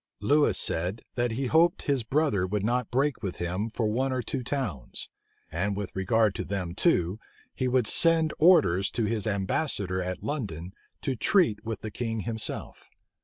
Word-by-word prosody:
Lewis 145 +1 +3
said, 90 +7 -2
that 120 -2 0
he 135 +4 -2
hoped 170 +6 +3
his 140 -3 +1
brother 110 -7 +1
would 100 +1 -2
not 125 0 0
break 135 +3 0
with 95 -5 -3
him 90 +5 -2
for 115 0 -1
one 130 +5 0
or 130 -1 -1
two 130 +4 -3
towns: 125 - -4 0.4
and 100 +5 -1
with 100 -2 -5
regard 110 +2 +2
to - - -3
them 90 -4 -3
too, 95 - +1 0.3
he 130 - -1
would 125 -2 +2
send 165 +4 +4
orders 150 - +5
to 115 - -1
his 110 0 -1
ambassador 100 - -1
at 90 0 -4
London 95 - -4 0.3
to 135 -3 -1
treat 160 - +2
with 115 -1 -5
the 110 - -5
king 115 0 -3
himself. 110 +1 -4
115 Hz, 170 wpm, -27 LUFS, 95-135 Hz, 0.4 s, orders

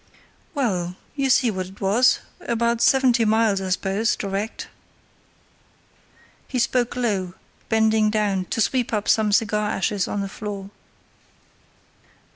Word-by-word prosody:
"Well, 180 -10 -1 0.2
you 275 -2 0
see 245 -2 +4
what 185 -2 -4
it 190 +2 -15
was; 210 +7 +3 0.2
about 235 0 0
seventy 255 -3 +4
miles, 220 -2 +2
I 190 - -4
suppose, 195 +4 0
direct." 200 +2 -4 1.8
He 260 - -3
spoke 245 0 +1
low, 200 -7 -1 0.3
bending 220 -1 +3
down 205 -3 0
to 225 - -2
sweep 245 +1 0
up 210 -1 -1
some 215 -2 +3
cigar 210 -1 +1
ashes 200 -1 -1
on 205 - -2
the 195 - -3
floor. 200 -1 -7
215 Hz, 125 wpm, -23 LUFS, 195-235 Hz, 1.8 s, see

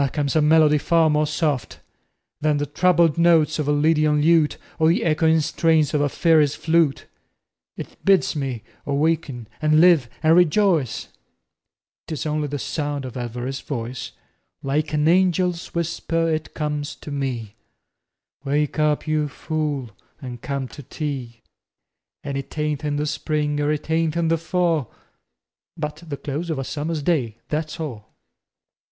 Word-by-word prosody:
comes 145 0 -1
a 155 - +4
melody 150 -1 +5
far 165 0 +3
more 150 0 +2
soft 150 -3 -2 0.6
Than 150 -1 +1
the 145 - -1
troubled 170 +1 +2
notes 165 -2 +4
of 150 - -1
a - - +2
lydian 150 0 +3
lute 160 -2 +3 0.2
Or 160 0 +4
the 170 - +2
echoing 160 0 +3
strains 155 0 +2
of 150 - +2
a 145 - +2
fairy's 155 -2 +3
flute; 160 -3 +1 0.7
It - - -9
bids 195 -3 +3
me 135 -6 -3 0.2
awaken 140 -5 -1
and 155 0 +4
live 165 -8 +5
and 160 +1 +5
rejoice, 175 - +2 1.0
'Tis 155 -2 -4
only 150 -1 -1
the 145 0 -3
sound 145 0 -3
of 125 - -7
Elviry's 125 +2 -4
voice 125 -2 -5 0.5
Like 150 +3 -1
an 150 0 +1
angel's 180 0 +2
whisper 165 0 -1
it 155 -1 -3
comes 150 -1 -3
to 150 - -10
me: 125 -7 -3 0.9
"Wake 150 +2 0
up, 150 -1 +1
you 155 -1 0
fool, 145 -5 -3 0.3
and 125 -3 -8
come 140 -2 -3
to 145 - -10
tea." 130 -4 -6 0.8
An' 140 0 -3
it 140 +3 -7
ain't 150 -1 -1
in 145 -1 -1
the 145 +1 -1
spring 150 -1 -1
er 145 +1 +1
it 150 -1 -3
ain't 160 0 +1
in 165 -1 +1
the 165 0 +2
fall, 165 -5 0 0.9
But 150 -1 -4
the 145 -2 -4
close 150 +6 -4
of 160 - -1
a 135 - -2
summer's 150 +2 -3
day, 130 -10 0
That's 155 +2 -3
all. 115 -9 -7
150 Hz, 155 wpm, -22 LUFS, 140-160 Hz, 1.0 s, melody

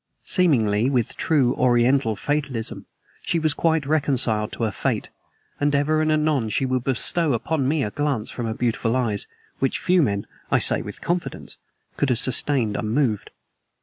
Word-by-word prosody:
Seemingly, 120 - +2
with 125 -5 -1
true 135 -6 +1
Oriental 125 -1 +2
fatalism, 140 -2 -3 0.3
she 170 - -1
was 155 -2 +3
quite 160 -2 0
reconciled 135 -8 +1
to - - -4
her 110 - 0
fate, - - -2 0.5
and 145 0 +1
ever 155 +2 +1
and 155 0 +1
anon 150 -7 +1
she 120 +5 0
would 130 -1 -1
bestow 140 +4 +2
upon 135 +3 -1
me 150 0 +1
a 105 - -3
glance 145 -5 -2
from 120 -2 -4
her 110 - -3
beautiful 115 0 -1
eyes 110 -6 -1 0.3
which 135 - 0
few 180 -1 +2
men, 100 -8 -1 0.2
I - - +3
say - - +4
with - - -9
confidence, 175 0 -4 0.4
could 145 - 0
have 125 - +1
sustained 125 -3 +2
unmoved. 110 -1 -1
130 Hz, 165 wpm, -22 LUFS, 115-150 Hz, 0.5 s, say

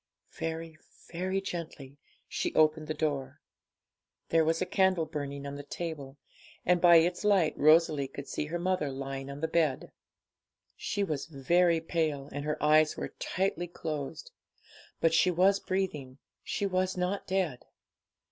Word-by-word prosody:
Very, 160 -1 -5 0.3
very 185 +3 -1
gently 155 -7 -7 0.3
she - - -3
opened 155 0 +3
the 155 - -3
door. 145 -4 -2 0.9
There 165 -1 +4
was 165 +1 +1
a 185 - 0
candle 185 -2 +2
burning 140 -2 -5
on 140 - -5
the 145 - -6
table, 145 -3 -6 0.5
and 180 -1 +3
by 175 -1 +8
its 175 +3 +3
light 195 -7 +3
Rosalie 155 -2 +4
could 140 +1 -9
see - - -3
her 170 +3 -3
mother 180 -4 0
lying 135 0 -5
on 140 +1 -7
the 160 - +1
bed. 160 -4 0 0.8
She 205 - -2
was 155 -7 -3
very 165 +4 +2
pale, 160 -4 -1
and 145 - -4
her 150 0 -1
eyes 155 0 +4
were - - -5
tightly 185 -2 -1
closed. 160 - -5 0.7
But 165 0 +3
she 165 +3 +4
was 190 +3 +3
breathing, 150 -9 -3 0.3
she 205 - -2
was 185 -1 0
not 180 +2 -2
dead. 185 -9 0
160 Hz, 150 wpm, -30 LUFS, 145-180 Hz, 0.9 s, by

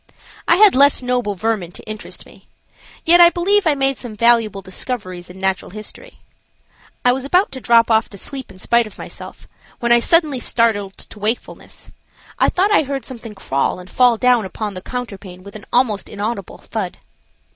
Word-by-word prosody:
I 340 - +5
had 415 +2 +6
less 280 0 +4
noble 245 -5 -1
vermin 200 -3 -2
to - - -10
interest 215 0 -7
me. - - -19 0.6
Yet 345 +1 +6
I 345 - +9
believe 375 +2 +1
I 300 - +3
made 270 -1 0
some 235 -4 -7
valuable 225 -3 +2
discoveries 185 -2 -6
in 185 +1 -12
natural 190 0 -1
history. 215 - -10 0.8
I 245 - +6
was 260 +1 -2
about 360 +8 +2
to 260 - -8
drop 235 -1 +4
off 220 +1 +3
to 200 - -10
sleep 265 +6 -6
in 190 - -14
spite 235 +4 +1
of 215 - -14
myself - - -10 0.3
when 235 0 0
I 240 - +8
was 235 - -1
suddenly 310 -6 +3
startled 215 -5 0
to 215 - -10
wakefulness. 220 +4 -4 0.5
I - - +4
thought 390 +3 +1
I - - +5
heard 275 -2 -4
something 230 -4 -9
crawl 140 -6 -1
and 180 0 -12
fall 245 -2 +4
down 250 -1 +3
upon 205 +2 -5
the 185 - -7
counterpane 195 -6 -7
with 200 +1 -12
an 210 - -10
almost 235 -5 +1
inaudible 205 -2 -5
thud. - - -5
235 Hz, 190 wpm, -19 LUFS, 200-265 Hz, 0.8 s, I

